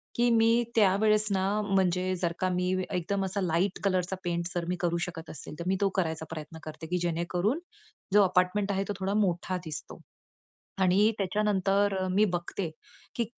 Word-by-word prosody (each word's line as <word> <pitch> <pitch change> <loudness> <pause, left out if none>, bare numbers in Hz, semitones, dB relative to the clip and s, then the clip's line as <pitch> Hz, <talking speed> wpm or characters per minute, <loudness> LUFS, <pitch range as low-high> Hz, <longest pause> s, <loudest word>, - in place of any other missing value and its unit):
की 240 0 +3
मी 230 +1 +4
त्यावेळेस 215 +1 +4
ना, 190 -1 +1 0.2
म्हणजे 185 -2 +1
जर 170 -1 0
का 185 - +1
मी 180 0 0 0.2
एकदम 195 +2 -1
असा 190 +1 -2
लाईट 180 +2 0
कलरचा 185 -1 +1
पेंट 170 -1 -1 0.3
करू 170 -1 +1
शकत 165 -2 -8
असेल, 155 - -9
तर - - -3
मी 190 - +2
तो 200 - +3
करायचा 160 -4 -1
प्रयत्न 160 0 -7
करते, 160 +1 -8
की 180 - 0
जेणेकरून 175 - 0 0.5
जो 205 0 +7
अपार्टमेंट 185 +2 +2
आहे, 195 0 0
तो - - 0
थोडा 190 +1 -1
मोठा 185 -2 0
दिसतो. 155 -2 -7 0.8
आणि 195 +4 +4
त्याच्यानंतर 200 0 +1
मी 205 +3 +4
बघते 175 +1 -3 0.5
की, 235 - 0
185 Hz, 160 wpm, -29 LUFS, 175-200 Hz, 0.8 s, जो